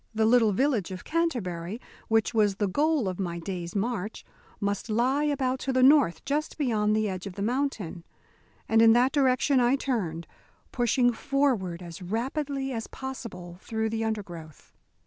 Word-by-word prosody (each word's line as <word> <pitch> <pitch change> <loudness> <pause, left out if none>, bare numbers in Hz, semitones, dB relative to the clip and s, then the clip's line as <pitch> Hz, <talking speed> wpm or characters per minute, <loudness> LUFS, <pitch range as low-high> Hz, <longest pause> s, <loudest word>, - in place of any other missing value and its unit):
The 220 0 +3
little 225 -1 +5
village 235 -2 +1
of 185 -1 -7
Canterbury, 225 - -2 0.3
which 225 -1 +2
was 210 -3 +3
the 205 0 0
goal 290 +3 +1
of 185 0 -4
my 175 -3 -2
day's 175 0 -5
march, 215 0 -3 0.3
must 200 +2 -2
lie 255 +7 +2
about 265 -3 0
to 270 - -2
the 255 0 +3
north 270 - +5
just 300 +2 -2
beyond 215 -7 +1
the 215 0 +1
edge 185 0 -4
of 195 - -7
the 200 - -3
mountain, 225 - -2 0.6
and 225 0 +4
in 225 0 +7
that 250 +3 +4
direction 270 -1 +3
I 245 +2 +4
turned, 190 -12 -2 0.5
pushing 245 0 +2
forward 235 - 0
as 170 +1 -9
rapidly 270 - -2
as 225 -2 -4
possible 220 -10 -8
through 220 -1 -2
the 225 0 -1
undergrowth. 175 -9 -6
225 Hz, 165 wpm, -27 LUFS, 190-265 Hz, 0.6 s, in